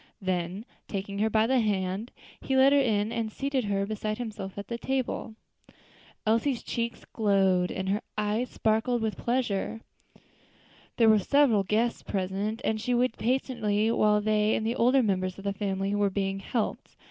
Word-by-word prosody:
Then, 185 +2 -2 0.2
taking 200 0 -4
her 220 +1 +2
by 220 0 +3
the 260 +2 +3
hand, 200 0 -1 0.3
he 265 - -1
led 270 +1 +6
her 285 - +5
in 220 -5 +1
and 230 -2 -2
seated 275 0 -1
her 200 -1 0
beside 215 0 -3
himself 210 -5 -6
at 200 -1 -6
the 235 0 -4
table. 255 -4 -2 0.9
Elsie's 230 +4 +1
cheek 235 0 -3 0.2
glowed 195 -4 +2
and 190 0 -3
her 205 +2 0 0.2
eyes 215 +4 0
sparkled 225 +2 0
with 220 -1 -1
pleasure. 230 -3 -1 1.2
There 230 - +5
were 215 -1 +6
several 255 -1 +3
guests 220 +5 0
present, 200 +4 -2
and 220 0 0
she 250 +2 0
waited 245 -1 +1
patiently 225 -3 0
while 210 -2 +3
they 215 0 +2
and 220 - -2
the 230 +2 0
older 255 +2 +4
members 185 -3 -1
of 195 - -10
the 200 0 -1
family 195 0 -2
were 205 -1 +2
being 195 0 -2
helped. 220 +3 -3
215 Hz, 170 wpm, -28 LUFS, 200-235 Hz, 1.2 s, led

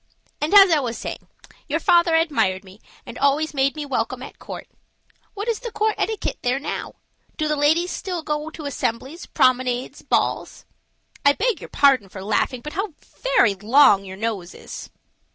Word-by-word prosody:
And, 300 - 0
as 390 -2 +9
I 315 - +4
was 240 -4 -3
saying, - - -7 0.4
your - - 0
father 345 -2 +4
admired 280 - +1
me 195 +2 -16 0.2
and - - -9
always 295 +3 +2
made 275 0 +1
me 300 -1 -5
welcome 275 -3 -2
at - - -11
court. - - -8 0.7
What 410 +2 -5
is 460 -3 0
the 475 - -6
court 435 0 +1
etiquette 440 -1 -2
there 250 +2 +1
now? 280 - -5 0.4
Do 310 - 0
the 300 - +1
ladies 315 +5 +2
still 360 -4 -4
go 300 +1 -3
to 315 -2 -9
assemblies, 265 +4 -3
promenades, 255 0 +1
balls? - - -1 0.6
I 285 - +6
beg 450 +4 -1
your - - -9
pardon 265 -8 +3
for 190 0 -9
laughing, 230 +4 0
but 300 - -7
how 385 -2 -3 0.2
very - - +3
long 210 0 +5
your 190 -1 -9
nose 205 -5 -4
is." - - -9
290 Hz, 175 wpm, -22 LUFS, 240-340 Hz, 0.7 s, as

